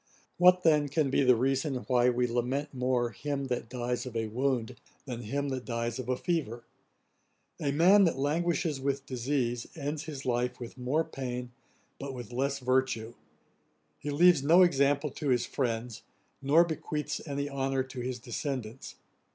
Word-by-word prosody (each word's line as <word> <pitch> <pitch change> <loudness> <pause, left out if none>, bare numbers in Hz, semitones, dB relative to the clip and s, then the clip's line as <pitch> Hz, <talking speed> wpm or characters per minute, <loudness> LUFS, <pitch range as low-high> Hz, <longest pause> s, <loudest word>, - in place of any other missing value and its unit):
What 180 0 +6
then 150 -3 +4
can 145 -1 +1
be - - +3
the 125 -2 +5
reason 135 +3 0
why 125 -1 +4
we 125 0 +1
lament 125 +5 -2
more 125 -2 0
him 140 -2 -3
that 120 -2 -3
dies 125 0 -3
of 120 - -8
a 115 -1 0
wound, 125 0 -1 0.3
than 125 -3 -5
him 140 +6 -2
that 130 -2 -3
dies 115 0 -3
of 130 -1 -5
a 125 - +1
fever? 145 - -2 1.0
A 140 - 0
man 185 +7 +6
that 165 - +1
languishes 155 0 0
with 140 0 -1
disease, 125 -2 -2
ends 150 0 -4
his 145 -3 -7
life 125 0 -1
with 120 -1 -8
more 130 +5 0
pain, 125 -4 -5 0.5
but 135 -1 -5
with 120 -1 -8
less 140 +2 0
virtue; 130 -3 0 0.9
he 145 - -5
leaves 165 +1 +5
no 165 +6 +6
example 140 -3 +2
to 145 +1 -4
his 125 -2 +2
friends, 115 -1 -3 0.4
nor 145 +5 +5
bequeaths 155 -2 -3
any 140 0 -2
honour 135 -1 -1
to 130 0 -9
his 125 0 -3
descendants. 125 0 -5
135 Hz, 165 wpm, -30 LUFS, 125-145 Hz, 1.0 s, What